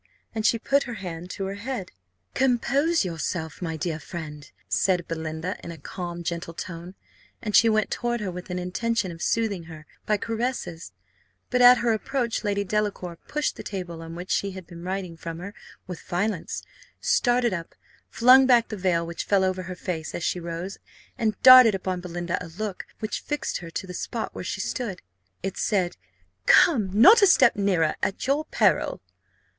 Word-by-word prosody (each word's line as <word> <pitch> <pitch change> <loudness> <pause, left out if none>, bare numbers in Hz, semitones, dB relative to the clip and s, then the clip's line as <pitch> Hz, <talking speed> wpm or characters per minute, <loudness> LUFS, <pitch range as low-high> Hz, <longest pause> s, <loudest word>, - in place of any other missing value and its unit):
and 220 -1 +1
she 230 - +3
put 275 +5 +2
her 240 - -4
hand 175 -3 -7
to 195 - -4
her 195 - -3
head. 245 -5 -4 0.4
"Compose 270 - +2
yourself, 160 -1 -4
my 165 -2 -3
dear 160 -1 -3
friend," 150 -2 -8 0.2
said 180 -3 +1
Belinda, 160 +2 -4
in - - -7
a 165 - -9
calm, 175 +3 -6
gentle 170 0 -4
tone; 175 +2 -7 0.4
and 210 -2 -2
she 230 - +7
went 215 -1 +1
toward 240 0 -1
her 200 -3 -3
with 180 +1 -8
an 180 - -3
intention 190 +2 -1
of 165 0 -10
soothing 210 -7 0
her 160 -2 -11 0.2
by 210 - +3
caresses; 225 -7 -3 0.6
but, 250 0 +2
at 245 0 +9
her 235 -1 +2
approach, 235 +1 -2
Lady 200 -1 0
Delacour 200 -3 -2
pushed 300 0 -1
the - - -6
table 175 -4 -6
on 165 0 -8
which 180 +2 -6
she 200 -1 0
had 190 -2 -9
been 170 0 -11
writing 185 -1 -4
from 165 0 -7
her 195 +4 -7 0.3
with 180 -2 -7
violence, 185 0 -2 0.4
started 245 - +2
up, 170 -2 -6 0.3
flung 255 +3 +6
back 240 -2 +4
the 215 - -4
veil 180 -3 +1
which 170 0 -5
fell 200 -2 +3
over 185 0 0
her 185 0 -6
face 170 -3 -4
as 175 - -4
she 180 - 0
rose, 170 +3 -6 0.4
and 215 -3 -1
darted 255 -4 +10
upon 185 -1 -3
Belinda 175 0 -3
a - - -8
look, 195 +3 -5
which 215 - -3
fixed 295 0 -3
her 170 - -9
to 165 - -5
the 180 - -8
spot - - -4
where - - -6
she - - -3
stood. 230 -8 -4 0.4
It 195 0 -3
said, 185 -5 0 0.5
"Come 225 - +5
not 320 - +7
a 400 - +7
step 360 - +5
nearer, 185 -6 +1
at 195 - -1
your 285 +4 +1
peril!" 205 - +1
190 Hz, 185 wpm, -25 LUFS, 170-230 Hz, 0.6 s, darted